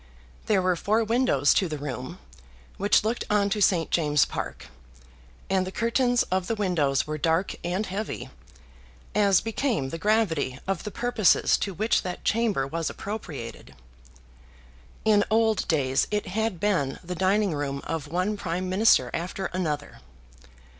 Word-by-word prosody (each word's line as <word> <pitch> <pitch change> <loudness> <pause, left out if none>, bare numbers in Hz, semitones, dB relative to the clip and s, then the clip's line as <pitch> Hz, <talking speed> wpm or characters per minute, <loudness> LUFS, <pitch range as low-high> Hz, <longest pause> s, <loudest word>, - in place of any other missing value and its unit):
There 195 -3 +3
were 185 -1 +2
four 215 +6 +1
windows 220 - +3
to 185 - +1
the 155 - -3
room, 140 -5 -6 0.6
which 200 +1 +3
looked 225 +3 -1
on 205 -1 +2
to 210 +1 0
St. 175 -5 +2
James's 150 -4 +3
Park, - - -6 0.8
and 190 -1 +1
the - - -5
curtains 245 +3 +2
of 185 -1 0
the 225 - 0
windows 165 -10 +1
were 155 0 -4
dark 165 +5 +1
and 180 +5 -1
heavy, 205 +3 -5 0.8
as 200 -3 +4
became 225 - -1
the 165 - -6
gravity 170 - +1
of 195 0 -2
the - - -2
purposes 230 -1 +3
to 195 -3 -3
which 215 +5 +1
that 180 -1 -6
chamber 215 -11 +1
was 165 +4 -3
appropriated. 150 - -7 1.3
In 210 -2 +5
old 220 -1 +2
days 135 -5 +1
it 210 0 -1
had 220 -2 -1
been 175 -9 0
the 180 +1 -5
dining 190 +1 +1
room 140 -2 -3
of 160 -3 -3
one 185 +6 -1
Prime 180 -1 -3
Minister 185 - +4
after 180 +3 -3
another. 150 -5 -3
185 Hz, 150 wpm, -26 LUFS, 160-215 Hz, 1.3 s, In